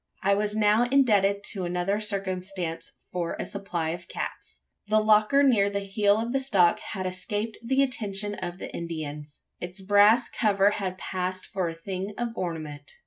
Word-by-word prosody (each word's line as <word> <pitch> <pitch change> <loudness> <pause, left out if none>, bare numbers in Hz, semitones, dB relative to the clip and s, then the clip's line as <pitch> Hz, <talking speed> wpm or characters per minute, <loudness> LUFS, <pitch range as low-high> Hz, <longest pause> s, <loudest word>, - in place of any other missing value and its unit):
I 200 +1 +4
was 210 +1 0
now 215 +2 +4
indebted 205 -7 +3
to 195 -4 -3
another 180 +3 -1
circumstance 190 -4 -3 0.2
for 175 -2 -2
a - - -2
supply 180 -5 -3
of 170 +1 -5
caps. - - -6 0.3
The 215 +1 +4
locker 215 +6 +4
near 220 -7 +4
the 200 0 -2
heel 200 +1 +2
of 230 +2 -2
the 270 - +2
stock 195 -10 +3
had 190 -3 -5
escaped 205 +4 -3
the 265 +3 +2
attention 210 -5 -2
of 175 -3 -5
the - - -8
Indians. 150 -3 -6 0.2
Its 175 +2 -7
brass 205 +4 +5
cover 200 -2 +2
had 185 -3 -3
passed 185 0 -3
for 185 -3 -2
a 165 - -7
thing 190 +4 -5
of 240 0 -1
ornament. 155 -6 -5
200 Hz, 170 wpm, -27 LUFS, 180-215 Hz, 0.3 s, brass